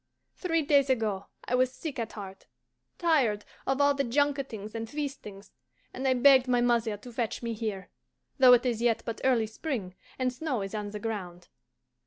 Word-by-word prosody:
Three 330 Hz, -3 st, 0 dB
days 280 Hz, -1 st, +3 dB
ago 215 Hz, -6 st, 0 dB, 0.2 s
I -, -, -4 dB
was 255 Hz, 0 st, +3 dB
sick 285 Hz, -1 st, -6 dB
at 225 Hz, -1 st, -4 dB
heart, 195 Hz, -2 st, -9 dB, 0.5 s
tired 265 Hz, -, +2 dB, 0.2 s
of 270 Hz, +1 st, +1 dB
all 285 Hz, 0 st, +5 dB
the 275 Hz, 0 st, 0 dB
junketings 270 Hz, -5 st, -1 dB
and 225 Hz, -1 st, -5 dB
feastings, 270 Hz, -9 st, -6 dB, 0.4 s
and 265 Hz, +1 st, -2 dB
I 260 Hz, -, +3 dB
begged 260 Hz, 0 st, +6 dB
my 245 Hz, -1 st, +3 dB
mother 235 Hz, -3 st, +1 dB
to 240 Hz, +4 st, -12 dB
fetch 235 Hz, 0 st, -3 dB
me 230 Hz, -1 st, -2 dB
here, 210 Hz, -4 st, -5 dB, 0.5 s
though 255 Hz, -1 st, +9 dB
it 245 Hz, +1 st, +4 dB
is 235 Hz, -2 st, 0 dB
yet 235 Hz, -2 st, +2 dB
but 230 Hz, -, -5 dB
early 245 Hz, -4 st, +3 dB
spring, 220 Hz, -, -4 dB, 0.2 s
and 255 Hz, -1 st, 0 dB
snow 255 Hz, -5 st, -2 dB
is 195 Hz, -, -6 dB
on 210 Hz, -1 st, -3 dB
the 210 Hz, 0 st, -6 dB
ground. 185 Hz, -6 st, -5 dB
240 Hz, 185 wpm, -29 LUFS, 215-270 Hz, 0.5 s, though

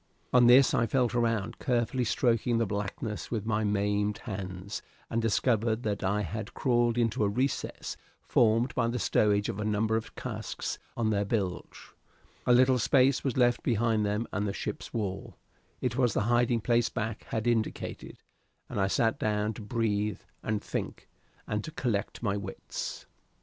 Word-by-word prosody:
On 125 Hz, -1 st, +7 dB
this 125 Hz, +2 st, +7 dB
I 115 Hz, -, +2 dB
felt 125 Hz, 0 st, +1 dB
around, 115 Hz, -4 st, 0 dB
carefully 125 Hz, -1 st, 0 dB
stroking 115 Hz, 0 st, +2 dB
the 115 Hz, -, +2 dB
blackness 105 Hz, +1 st, -4 dB
with 110 Hz, -3 st, -2 dB
my 110 Hz, -1 st, 0 dB
maimed 105 Hz, 0 st, +1 dB
hands, 95 Hz, 0 st, -6 dB, 0.3 s
and 115 Hz, -, +1 dB
discovered 115 Hz, +1 st, +1 dB
that 105 Hz, -1 st, -2 dB
I 100 Hz, +2 st, +1 dB
had 105 Hz, +3 st, -5 dB
crawled 120 Hz, -2 st, +2 dB
into 115 Hz, -2 st, +1 dB
a 100 Hz, -, +2 dB
recess 130 Hz, +6 st, -2 dB, 0.3 s
formed 115 Hz, +2 st, +3 dB
by 115 Hz, -2 st, +1 dB
the 120 Hz, +1 st, -1 dB
stowage 105 Hz, -1 st, +2 dB
of 105 Hz, -3 st, -4 dB
a -, -, -1 dB
number 110 Hz, +1 st, +1 dB
of 110 Hz, 0 st, -3 dB
casks -, -, -4 dB, 0.2 s
on 110 Hz, -2 st, +1 dB
their 100 Hz, -1 st, +1 dB
bilge; 100 Hz, -3 st, -3 dB, 0.6 s
a -, -, +5 dB
little 130 Hz, +1 st, +5 dB
space 130 Hz, +2 st, +3 dB
was 135 Hz, -3 st, -1 dB
left 120 Hz, -1 st, +3 dB
behind 115 Hz, -2 st, +1 dB
them 105 Hz, +2 st, 0 dB
and 100 Hz, +2 st, -1 dB
the 100 Hz, -, -2 dB
ship's -, -, -5 dB
wall; 100 Hz, -4 st, -4 dB, 0.4 s
it 125 Hz, -1 st, -1 dB
was 120 Hz, -5 st, +2 dB
the -, -, +2 dB
hiding 120 Hz, +1 st, +2 dB
place 120 Hz, +1 st, +2 dB
Back 110 Hz, 0 st, -4 dB
had 110 Hz, 0 st, -3 dB
indicated, 115 Hz, -2 st, -2 dB, 0.5 s
and 100 Hz, -, -1 dB
I 95 Hz, -, +3 dB
sat 115 Hz, +3 st, +1 dB
down 105 Hz, 0 st, 0 dB
to 110 Hz, -, -9 dB
breathe 105 Hz, -2 st, -1 dB, 0.2 s
and 110 Hz, -1 st, -2 dB
think, -, -, -5 dB, 0.4 s
and 105 Hz, 0 st, -2 dB
to -, -, -6 dB
collect 120 Hz, -8 st, -2 dB
my 100 Hz, -3 st, +1 dB
wits. 100 Hz, -2 st, -6 dB
110 Hz, 170 wpm, -29 LUFS, 105-120 Hz, 0.6 s, On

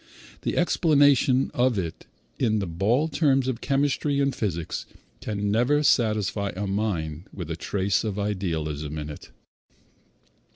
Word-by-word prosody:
The -, -, -2 dB
explanation 145 Hz, -6 st, +3 dB
of 125 Hz, -2 st, +2 dB
it 85 Hz, -8 st, -4 dB, 0.3 s
in 110 Hz, -1 st, +2 dB
the 100 Hz, -, -1 dB
bald 115 Hz, -, 0 dB
terms 135 Hz, -4 st, +2 dB
of 125 Hz, -2 st, -2 dB
chemistry 140 Hz, +1 st, +1 dB
and 140 Hz, -1 st, +2 dB
physics 85 Hz, -6 st, -3 dB, 0.3 s
can 105 Hz, -1 st, -2 dB
never 125 Hz, +7 st, +2 dB
satisfy 105 Hz, -6 st, +2 dB
a 100 Hz, +2 st, -3 dB
mind 95 Hz, -6 st, -2 dB
with 85 Hz, -4 st, -6 dB
a -, -, -1 dB
trace 95 Hz, +2 st, 0 dB
of 105 Hz, -3 st, -3 dB
idealism 80 Hz, -7 st, -2 dB
in 75 Hz, 0 st, -5 dB
it. 75 Hz, -, -11 dB
105 Hz, 135 wpm, -25 LUFS, 90-135 Hz, 0.3 s, explanation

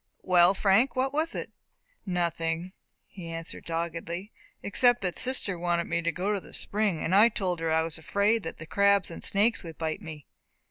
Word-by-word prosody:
"Well, 180 Hz, +1 st, +5 dB
Frank, 205 Hz, +7 st, +3 dB
what 265 Hz, +1 st, 0 dB
was 315 Hz, +3 st, -1 dB
it?" -, -, -5 dB, 0.6 s
"Nothing," 170 Hz, 0 st, -1 dB, 0.3 s
he 180 Hz, -4 st, -10 dB
answered, 165 Hz, 0 st, -7 dB
doggedly, 170 Hz, +4 st, -4 dB, 0.3 s
"except 245 Hz, +4 st, +3 dB
that 180 Hz, -2 st, -2 dB
sister 230 Hz, -8 st, +1 dB
wanted 175 Hz, 0 st, 0 dB
me 170 Hz, +1 st, -1 dB
to 170 Hz, 0 st, 0 dB
go 190 Hz, +5 st, -1 dB
to 200 Hz, -, -1 dB
the -, -, -16 dB
spring, 205 Hz, -6 st, -1 dB
and 170 Hz, -, -1 dB
I 210 Hz, +4 st, +7 dB
told 185 Hz, -6 st, -2 dB
her 165 Hz, -1 st, -1 dB
I 160 Hz, 0 st, +3 dB
was 165 Hz, 0 st, -2 dB
afraid 205 Hz, +7 st, +1 dB
that 165 Hz, -, -7 dB
the 155 Hz, -, -8 dB
crabs 200 Hz, +2 st, +2 dB
and -, -, -8 dB
snakes 210 Hz, +4 st, +2 dB
would 165 Hz, -3 st, -10 dB
bite 160 Hz, -1 st, -3 dB
me." 155 Hz, -3 st, -9 dB
180 Hz, 190 wpm, -28 LUFS, 165-205 Hz, 0.6 s, I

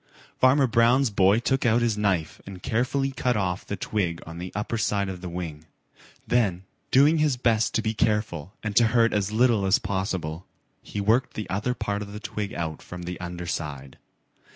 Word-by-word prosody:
Farmer 135 Hz, +2 st, +5 dB
Brown's 120 Hz, +2 st, +3 dB
boy 100 Hz, +1 st, +4 dB
took 130 Hz, +3 st, 0 dB
out 120 Hz, 0 st, +3 dB
his 115 Hz, -2 st, +1 dB
knife 95 Hz, -7 st, -1 dB
and 95 Hz, -2 st, -9 dB
carefully 135 Hz, +4 st, 0 dB
cut 125 Hz, -3 st, 0 dB
off 95 Hz, -2 st, -1 dB
the 100 Hz, -, -2 dB
twig 90 Hz, -3 st, -2 dB
on 85 Hz, +1 st, -8 dB
the 90 Hz, +1 st, -6 dB
upper 105 Hz, +3 st, -2 dB
side 100 Hz, -3 st, 0 dB
of 90 Hz, -2 st, -6 dB
the 90 Hz, -, -5 dB
wing. 80 Hz, -3 st, -6 dB, 0.6 s
Then, 100 Hz, -7 st, +1 dB, 0.3 s
doing 145 Hz, +4 st, +5 dB
his 150 Hz, -4 st, +2 dB
best 115 Hz, -3 st, +1 dB
to 110 Hz, -, +1 dB
be 110 Hz, -, 0 dB
careful 105 Hz, -7 st, -1 dB
and 110 Hz, -1 st, -3 dB
to 115 Hz, -, +6 dB
hurt 115 Hz, 0 st, +4 dB
as 105 Hz, -1 st, 0 dB
little 115 Hz, -2 st, +3 dB
as 95 Hz, +1 st, +4 dB
possible, 95 Hz, -4 st, -3 dB, 0.3 s
he 105 Hz, -, -6 dB
worked 115 Hz, +6 st, +2 dB
the 110 Hz, -, -4 dB
other 110 Hz, +6 st, -1 dB
part 100 Hz, -3 st, -2 dB
of 100 Hz, 0 st, -7 dB
the 105 Hz, -, -6 dB
twig 105 Hz, -2 st, -4 dB
out 80 Hz, -2 st, -4 dB
from 90 Hz, 0 st, -8 dB
the 90 Hz, +1 st, -5 dB
under 90 Hz, 0 st, -6 dB
side. 70 Hz, -5 st, -5 dB
105 Hz, 195 wpm, -25 LUFS, 90-115 Hz, 0.6 s, to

